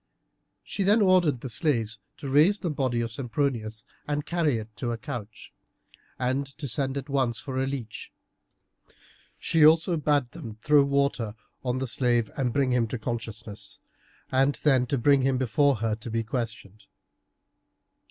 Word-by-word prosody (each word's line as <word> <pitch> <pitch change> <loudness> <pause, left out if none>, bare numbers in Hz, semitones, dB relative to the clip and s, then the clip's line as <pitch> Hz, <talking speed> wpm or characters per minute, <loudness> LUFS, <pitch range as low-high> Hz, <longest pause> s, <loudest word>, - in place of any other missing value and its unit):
She - - -5
then 205 +4 +4
ordered 180 - +3
the 130 - -5
slaves 115 -7 -1 0.2
to 140 - -7
raise 155 +10 +4
the 175 - -1
body 130 -5 0
of 115 -1 -3
Sempronius 115 -3 -2 0.2
and 145 0 -2
carry 165 -7 +1
it 110 0 -8
to 120 - -3
a 115 - -2
couch, 115 -5 -8 0.6
and 130 +2 -1
to 150 -2 -4
send 135 +2 +1
at 140 0 -5
once 130 -5 0
for 130 -2 -3
a 135 - 0
leech. 130 -5 -6 1.3
She 160 -2 +2
also 165 +3 +5
bade 145 -4 +1
them 120 -10 -8
throw 145 +5 +4
water 140 -6 0 0.3
on 125 -1 -1
the 135 - -2
slave 120 -2 +1
and 130 -4 0
bring 135 0 +1
him 120 -2 +2
to 125 - -4
consciousness, 110 -2 -6 0.5
and 135 +2 +3
then 130 -4 +4
to 140 - 0
bring 140 +2 +4
him 130 0 +2
before 135 +3 +2
her 110 0 -1
to 115 +1 -8
be 115 0 -1
questioned. 110 -3 -5
130 Hz, 160 wpm, -27 LUFS, 115-145 Hz, 1.3 s, also